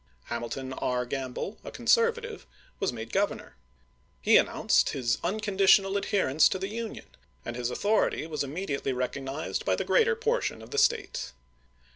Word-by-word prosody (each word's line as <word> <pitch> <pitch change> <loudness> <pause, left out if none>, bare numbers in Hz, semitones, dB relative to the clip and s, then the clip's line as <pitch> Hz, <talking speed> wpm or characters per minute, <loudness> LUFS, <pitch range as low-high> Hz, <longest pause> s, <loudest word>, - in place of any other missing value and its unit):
Hamilton 120 +3 -4
R. 125 -1 -1
Gramble, 135 - -4
a - - -7
conservative, 465 -1 +1 0.3
was 195 - 0
made 115 -1 -8
Grovernor. 200 +1 -1 0.7
He - - +4
announced - - +3
his 120 -3 0
unconditional 195 0 +3
adherence 190 -7 +3
to - - -1
the 190 +1 -4
Union, 225 +1 -5 0.4
and 120 - -4
his 120 0 -2
authority 205 - +1
was 155 -2 -2
immediately 140 -2 -3
recog 125 +2 -3
nized 140 +4 -3
by - - +1
the - - -3
greater 465 -1 +3
portion 460 +2 -1
of - - -13
the 435 - +1
State. 460 - +1
185 Hz, 150 wpm, -28 LUFS, 130-215 Hz, 0.7 s, He